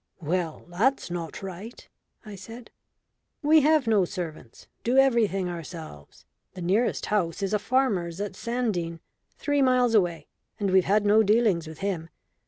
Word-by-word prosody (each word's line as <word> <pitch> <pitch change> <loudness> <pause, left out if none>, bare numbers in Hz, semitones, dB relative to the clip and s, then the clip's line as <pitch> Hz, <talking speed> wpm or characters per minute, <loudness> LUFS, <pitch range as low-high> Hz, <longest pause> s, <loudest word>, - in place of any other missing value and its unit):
"Well, 165 0 -2
that's 200 +5 0
not 170 +1 -5
right," 195 +5 -8 0.4
I 210 - -9
said. 225 +5 -11 0.7
"We 310 +1 +6
have 305 -1 +3
no 215 -4 +3
servants 170 - -7 0.2
do 245 +3 +1
everything 230 -8 +3
ourselves. 165 - -9 0.3
The 185 - -7
nearest 205 +8 +1
house 200 -2 -1
is 195 - -1
a 210 - +2
farmer's 200 -9 0
at 205 0 -3
Sandene, 210 -9 -2 0.4
three 290 -1 0
miles 250 -2 +3
away, 175 -7 +1 0.3
and 200 -2 0
we've 185 -1 +4
had 205 +2 +2
no 210 +2 +5
dealings 210 -6 +2
with 160 +2 -10
him. 180 -5 -3
200 Hz, 150 wpm, -26 LUFS, 170-235 Hz, 0.7 s, We